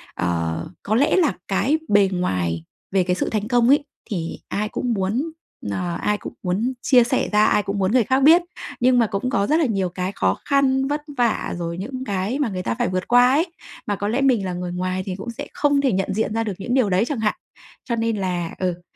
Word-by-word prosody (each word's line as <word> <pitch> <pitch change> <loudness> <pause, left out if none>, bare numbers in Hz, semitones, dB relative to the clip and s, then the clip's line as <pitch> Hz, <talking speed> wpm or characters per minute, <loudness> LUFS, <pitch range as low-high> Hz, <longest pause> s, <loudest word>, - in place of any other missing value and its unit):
ờ, 85 - -2 0.2
có 215 - 0
lẽ 280 +5 +3
là 330 - +3
cái 200 +11 +2
bề 200 -2 +5
ngoài 90 - -1 0.3
về 190 -1 +3
cái 180 0 0
sự - - -1
thành 215 -1 -2
công 240 -1 +3
ấy 285 +1 +4 0.2
thì 170 -5 -4
ai 210 +1 -2
cũng 245 +1 -2
muốn, 220 +11 -1 0.3
nờ, 95 -4 -2
ai 210 - +1
cũng - - -8
muốn 205 +8 0
chia 250 -3 +5
sẻ 250 +2 0
ra, 210 0 +4
ai 210 - +3
cũng 200 0 -3
muốn 190 0 +1
người 250 0 +4
khác 260 +5 +2
biết. 330 +4 +7 0.4
Nhưng 250 0 +4
mà 230 - +3
cũng 205 +5 -2
có 200 -6 +1
rất 315 +2 +3
là 320 - +3
nhiều 195 -7 0
cái 180 +2 -3
khó - - 0
khăn, 270 -1 +2
vất 295 +1 -1 0.2
vả, 240 -3 +1
rồi 170 0 -4
những 255 +7 -5
cái 200 +5 -2
mà 275 -6 +1
người 185 -2 -4
ta 115 - -1
phải - - +1
vượt 185 0 -2
qua 245 0 +6
ấy. 310 +6 +3 0.4
Mà 205 - 0
có 205 +1 -3
lẽ 245 +6 0
mình 245 -8 +3
là 180 - -3
người 180 0 -4
ngoài 185 +1 -2
thì 185 - -4
cũng 195 +5 -7
sẽ 230 - -7
không 285 -1 +2
thể 270 -2 +2
nhận 195 0 -1
diện 215 +1 -1
ra 225 - 0
được 210 -3 -3
những 240 +5 -3
điều 255 -6 +3
đấy 190 +4 +2
chẳng 270 -1 -3
hạn. 215 -1 +1 0.5
Cho 235 - -1
nên 225 -1 0
là 180 -3 -2
ừ, 180 -2 -2
210 Hz, 245 wpm, -22 LUFS, 185-250 Hz, 0.5 s, biết